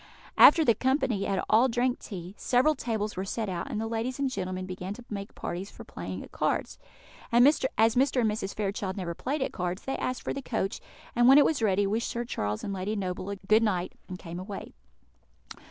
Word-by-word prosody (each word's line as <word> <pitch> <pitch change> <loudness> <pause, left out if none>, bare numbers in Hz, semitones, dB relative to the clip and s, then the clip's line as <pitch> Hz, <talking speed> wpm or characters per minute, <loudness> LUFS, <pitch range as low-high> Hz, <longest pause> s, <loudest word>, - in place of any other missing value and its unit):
After 320 +1 +8
the 230 - +6
company 255 -5 0
had 195 -2 0
all 230 +4 +5
drank 245 +1 0
tea, 180 -3 -8
several 260 +7 +3
tables 220 -6 -3
were 185 - -2
set 215 +2 -3
out, 175 -2 -4
and 215 - -3
the 225 - -2
ladies 230 +3 -2
and 275 -2 0
gentlemen 185 -3 -3
began 185 +1 -5
to 245 - -12
make 200 -1 -6
parties 185 +3 -5
for - - -11
playing - - -6
at - - -13
cards. - - -1 0.5
As 235 +1 +6
Mr. 280 -1 +4
and 230 +1 +3
Mrs. 200 -2 -4
Fairchild 195 -2 -2
never 175 -3 -3
played 270 - -2
at - - -4
cards, 180 +2 -3
they 270 - -2
asked 255 - -3
for - - -2
the 275 - -4
coach, 220 -6 -2 0.3
and, 240 0 +5
when 270 +2 +9
it 295 - +7
was 300 -6 +1
ready, 200 -2 +2
wished 220 +4 -1
Sir 240 0 -3
Charles 105 - -3
and 200 - -3
Lady 195 +3 -2
Noble 190 0 -3
good 215 +2 +5
night, 185 -5 0 0.2
and 185 - -5
came 175 -1 -7
away. 195 +1 -7
215 Hz, 210 wpm, -28 LUFS, 190-245 Hz, 0.5 s, when